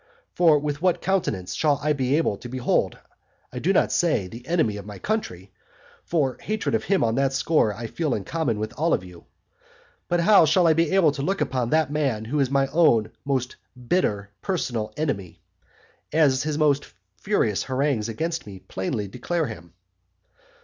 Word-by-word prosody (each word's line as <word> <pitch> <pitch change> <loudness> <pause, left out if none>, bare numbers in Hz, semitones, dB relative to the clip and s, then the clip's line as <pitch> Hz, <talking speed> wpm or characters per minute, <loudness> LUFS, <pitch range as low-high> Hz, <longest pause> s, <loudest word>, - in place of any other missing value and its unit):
For 165 -4 +5
with 145 0 -3
what 180 -1 +2
countenance 115 - -1
shall 150 -3 +2
I 150 0 +2
be 135 -1 0
able 160 -10 +1
to 120 - -9
behold, 130 0 0 0.6
(I 125 - -4
do 175 +9 +1
not 195 - +2
say, 155 - +1
the 115 +6 -11
enemy 155 -12 +1
of 100 - -8
my 105 -1 -8
country, 100 - -3 0.5
for 140 -7 0
my - - -17
hatred 215 0 -2
of 225 - 0
him 195 -1 +2
on 115 -1 +1
that 135 +1 +1
score 145 -5 +2
I 115 +3 -7
feel 150 +4 -1
in 100 - -4
common 155 -7 -1
with 110 +1 -3
you 90 - 0
all,) - - -26 0.8
but 175 0 +1
how 200 -1 +6
shall 170 +4 +3
I 165 - +6
bear 165 +4 +2
to 140 - -5
look 195 +7 -1
upon 125 -2 -1
that 155 -1 +2
man 135 -8 -1
who 145 +6 -1
is 135 -2 +2
my 135 0 +2
own 145 -9 +3
most 130 -2 -1 0.3
bitter 105 - 0
personal 120 - -2
enemy, 105 - -3 0.7
as 145 -4 +3
his 150 -1 -2
most 145 -2 +2 0.3
furious 115 - 0
harangues 130 -4 0
against 165 +5 -3
me 100 -2 -9
plainly 95 +3 -4
declare 160 - -2
him? 85 - -9
140 Hz, 180 wpm, -24 LUFS, 110-165 Hz, 0.8 s, how